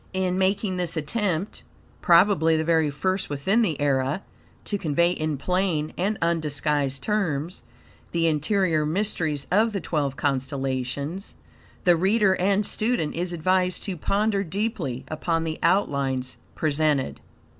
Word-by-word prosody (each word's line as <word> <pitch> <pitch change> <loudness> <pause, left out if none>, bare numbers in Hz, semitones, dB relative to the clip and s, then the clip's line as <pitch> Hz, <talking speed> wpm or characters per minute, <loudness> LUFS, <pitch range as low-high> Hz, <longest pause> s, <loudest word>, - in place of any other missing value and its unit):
In 185 -1 0
making 190 0 0
this 175 -2 -2
attempt, 180 +3 -2 0.4
probably 170 -3 +5
the 160 - 0
very 160 -2 +2
first 185 +7 -2
within 170 +11 +1
the 170 -10 0
era, 140 +4 0 0.4
to 205 - -2
convey 170 0 +2
in 155 -4 -2
plain 175 -1 0
and 200 +4 -1
undisguised 150 -4 0
terms 175 -6 -1 0.5
the 170 -1 +1
interior 160 +1 +1
mysteries 160 -4 -1
of 215 +4 +3
the 200 - -1
twelve 145 -6 -1
constellations, 135 - -2 0.5
the 175 -2 +5
reader 195 +3 +3
and 200 +3 +2
student 215 -10 0
is 175 +2 -3
advised 180 +1 +1
to 195 - -3
ponder 200 +4 0
deeply 185 - -3
upon 165 +1 -1
the 160 -1 -4
outlines 140 -8 +1 0.2
presented. 150 -3 0
165 Hz, 130 wpm, -25 LUFS, 150-190 Hz, 0.5 s, probably